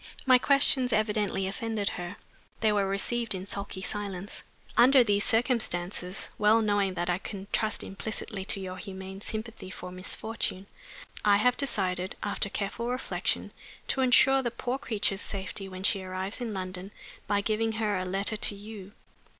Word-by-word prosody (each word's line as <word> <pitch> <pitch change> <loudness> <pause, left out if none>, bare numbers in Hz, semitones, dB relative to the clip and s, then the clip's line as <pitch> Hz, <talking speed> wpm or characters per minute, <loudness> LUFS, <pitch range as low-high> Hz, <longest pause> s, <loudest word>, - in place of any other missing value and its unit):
My 255 -1 +7
questions 265 -2 +4
evidently 210 -3 +1
offended 220 +1 -1
her; 175 +2 -5 0.5
they 220 -1 +4
were 200 -2 +2
received 205 +3 0
in 185 0 -5
sulky 200 -1 -5
silence. 200 -1 -4 0.3
Under 255 +1 +8
these 205 -2 +3
circumstances, 205 -6 0
well 210 +2 +6
knowing 205 -3 +2
that 175 0 -1
I 180 0 +1
can 195 -1 -6
trust 215 -1 +1
implicitly 200 0 -4
to 200 - 0
your 185 -1 -5
humane 190 0 -7
sympathy 220 -2 -5
for 180 -1 -7
misfortune, 190 +1 -3 0.6
I 205 -1 +6
have 250 +4 +4
decided 190 -9 -1
(after 205 0 -1
careful 215 +4 -2
reflection) 250 +1 -1 0.4
to 265 - +2
insure 265 +1 +6
the 240 - 0
poor 245 +2 -3
creature's 205 -5 -1
safety 195 0 -4
when 185 0 -7
she 195 0 +3
arrives 190 +4 -3
in 235 -2 -2
London 185 -1 -4 0.4
by 205 -1 +2
giving 220 +2 0
her 215 -3 0
a - - -1
letter 195 +4 -1
to 205 - 0
you. 205 -1 -9
205 Hz, 160 wpm, -29 LUFS, 190-225 Hz, 0.6 s, Under